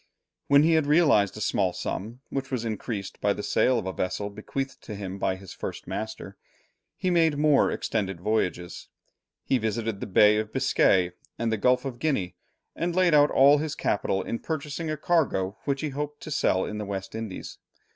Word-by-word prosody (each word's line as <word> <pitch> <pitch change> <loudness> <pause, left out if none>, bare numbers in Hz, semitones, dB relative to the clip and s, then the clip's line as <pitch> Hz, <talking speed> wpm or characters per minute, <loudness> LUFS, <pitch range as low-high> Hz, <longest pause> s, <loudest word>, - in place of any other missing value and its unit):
When 140 +1 +6
he 165 - +4
had 160 -3 +3
realized 145 - +4
a - - -7
small 95 -2 +1
sum, 115 +8 -5
which 135 -1 -3
was 125 -4 -2
increased 110 -2 -5
by 100 0 +2
the 105 - -6
sale 130 -1 +2
of 110 - -3
a 95 - -3
vessel 100 +3 -3
bequeathed 135 +6 -5
to 105 - -7
him 100 -1 -6
by 95 - 0
his 95 0 -11
first 90 -4 -6
master, 100 +1 -6 0.6
he 185 -1 0
made 165 -4 +3
more 150 -1 +4
extended 95 -5 -2
voyages; 90 -3 -2 0.6
he 130 - +1
visited 110 -1 -2
the - - -5
Bay 105 +2 +5
of 110 0 -2
Biscay 95 -8 +3 0.3
and 115 -1 -1
the - - +2
Gulf 125 +5 +2
of 125 -3 -5
Guinea, 125 - -1 0.4
and 170 0 -2
laid 180 -3 +4
out 145 0 +6
all 140 +2 +6
his 155 -1 -3
capital 95 -1 0
in 115 - -3
purchasing 155 +1 -4
a 155 - -2
cargo 135 - 0
which 140 -1 -1
he 155 - -2
hoped 145 +1 -5
to 155 - -7
sell 95 -8 +1
in 105 - -5
the 105 - -4
West 95 -1 -5
Indies. 110 -4 -6
115 Hz, 195 wpm, -26 LUFS, 100-145 Hz, 0.6 s, When